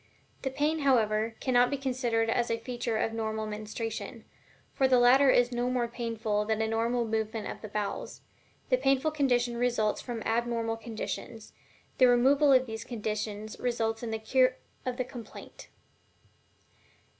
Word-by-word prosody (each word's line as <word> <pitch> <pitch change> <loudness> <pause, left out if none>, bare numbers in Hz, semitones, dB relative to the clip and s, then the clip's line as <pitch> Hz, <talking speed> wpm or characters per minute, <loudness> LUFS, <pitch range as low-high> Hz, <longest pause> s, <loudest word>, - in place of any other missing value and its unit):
The 265 - -1
pain, 295 +4 0
however, 225 -5 +2
cannot 245 -1 +3
be 280 - -1
considered 245 -4 0
as 235 +1 +1
a 230 - 0
feature 235 -1 -3
of 225 - -1
normal 220 -1 -2
menstruation, 215 +2 -5 0.5
for 270 - +3
the 255 -1 +4
latter 260 +3 +6
is 245 -1 +4
no 245 +1 -1
more 250 -1 0
painful 225 -3 -2
than 220 0 -1
a 220 - +1
normal 230 +2 0
movement 220 0 -2
of - - -7
the 215 - -6
bowels 210 -1 -4 0.5
the 255 - +4
painful 270 +3 +2
condition 245 -5 +1
results 235 -3 +1
from 235 -3 -5
abnormal 230 0 -1
conditions, 225 0 -6 0.5
the 255 - +7
removal 275 +4 +5
of 260 -1 +5
these 220 -2 -6
conditions 215 -2 -4
resulting 230 -1 -1
in - - -4
the 220 - -1
cure 255 +3 +2 0.3
of 250 -1 -2
the 255 - -1
complaint. 240 -2 -11
235 Hz, 155 wpm, -29 LUFS, 220-255 Hz, 0.5 s, the